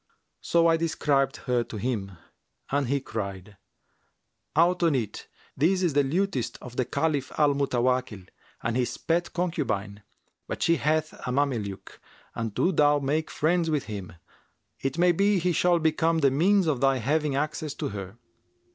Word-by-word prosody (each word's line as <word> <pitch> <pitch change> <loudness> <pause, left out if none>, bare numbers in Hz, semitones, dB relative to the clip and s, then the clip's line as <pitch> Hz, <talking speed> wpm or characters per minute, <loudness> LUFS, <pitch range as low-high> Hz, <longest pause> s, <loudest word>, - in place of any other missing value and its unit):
So 170 0 +2
I 165 0 +4
described 145 -4 +1
her 125 -2 +1
to 110 - -7
him 105 -4 -3 0.6
and 140 -1 +1
he 140 +3 +1
cried, 100 -5 -6 1.0
'Out 175 +3 +3
on 165 -4 +3
it! 110 -5 -3 0.3
This 185 +6 +2
is 170 -5 +1
the 145 0 +4
lutanist 170 - -1
of 125 -1 -10
the 130 - 0
Caliph 150 -1 -1
Al 150 -2 +4
Mutawakkil 125 -7 0 0.4
and 115 0 -1
his 125 -1 -1
pet 170 +1 -1
concubine. 130 - -2 0.5
But - - -3
she 170 0 +3
hath 155 +2 0
a - - -7
Mameluke[FN#356] 125 -8 -2 0.4
and 115 -1 -3
do 185 - +2
thou 145 -3 +4
make 145 +3 -1
friends 165 +2 +1
with 150 -3 0
him; 100 -6 -7 0.7
it 135 +3 -3
may 175 +1 +5
be 200 +3 +2
he 180 0 +1
shall 175 +1 +3
become 165 +1 +1
the 140 -4 +3
means 185 +7 +3
of 145 -6 0
thy 135 -1 +3
having 145 +4 0
access 150 0 -2
to - - -3
her.' 100 +1 -7
145 Hz, 165 wpm, -26 LUFS, 125-165 Hz, 1.0 s, may